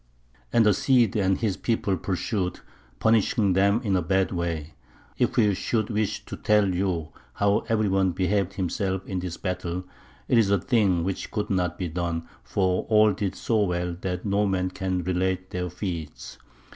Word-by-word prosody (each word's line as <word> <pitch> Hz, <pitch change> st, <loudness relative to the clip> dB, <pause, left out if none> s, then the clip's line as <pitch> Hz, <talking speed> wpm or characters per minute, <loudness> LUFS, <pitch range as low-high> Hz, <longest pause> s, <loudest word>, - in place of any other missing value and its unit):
And 115 Hz, -2 st, +4 dB
the 105 Hz, -, +5 dB
Cid 120 Hz, -2 st, +3 dB
and 95 Hz, -2 st, +2 dB
his 105 Hz, -5 st, -1 dB
people 110 Hz, -4 st, 0 dB
pursued, 90 Hz, +1 st, -2 dB, 0.4 s
punishing 110 Hz, -, +3 dB
them 100 Hz, +3 st, +3 dB
in 100 Hz, -4 st, +1 dB
a 90 Hz, -, +2 dB
bad 95 Hz, +3 st, +1 dB
way. 85 Hz, -3 st, -3 dB, 0.5 s
If -, -, +1 dB
we 105 Hz, -3 st, +4 dB
should 110 Hz, +3 st, -1 dB
wish 105 Hz, -1 st, -1 dB
to -, -, -7 dB
tell 105 Hz, -3 st, +3 dB
you 90 Hz, -4 st, -1 dB, 0.3 s
how 100 Hz, +1 st, +2 dB
every 110 Hz, -2 st, +2 dB
one 95 Hz, -1 st, +2 dB
behaved 95 Hz, +1 st, 0 dB
himself 95 Hz, +1 st, -2 dB
in 95 Hz, -2 st, -3 dB
this 90 Hz, -1 st, -5 dB
battle, 90 Hz, -1 st, -3 dB, 0.4 s
it 120 Hz, -, +4 dB
is 105 Hz, -3 st, +3 dB
a 100 Hz, -1 st, +3 dB
thing 95 Hz, -5 st, +2 dB
which 95 Hz, +1 st, -3 dB
could 105 Hz, -1 st, -3 dB
not 90 Hz, -3 st, 0 dB
be 90 Hz, -, -2 dB
done, 85 Hz, 0 st, -3 dB, 0.2 s
for 95 Hz, -2 st, 0 dB
all 110 Hz, -1 st, +5 dB
did 95 Hz, -1 st, -3 dB
so 110 Hz, +1 st, 0 dB
well 90 Hz, -2 st, -1 dB
that 90 Hz, 0 st, -3 dB
no 100 Hz, +1 st, +2 dB
man 95 Hz, -1 st, 0 dB
can 95 Hz, -1 st, -2 dB
relate 95 Hz, +1 st, -1 dB
their 90 Hz, 0 st, -3 dB
feats. 85 Hz, -4 st, -6 dB
95 Hz, 175 wpm, -26 LUFS, 90-105 Hz, 0.5 s, the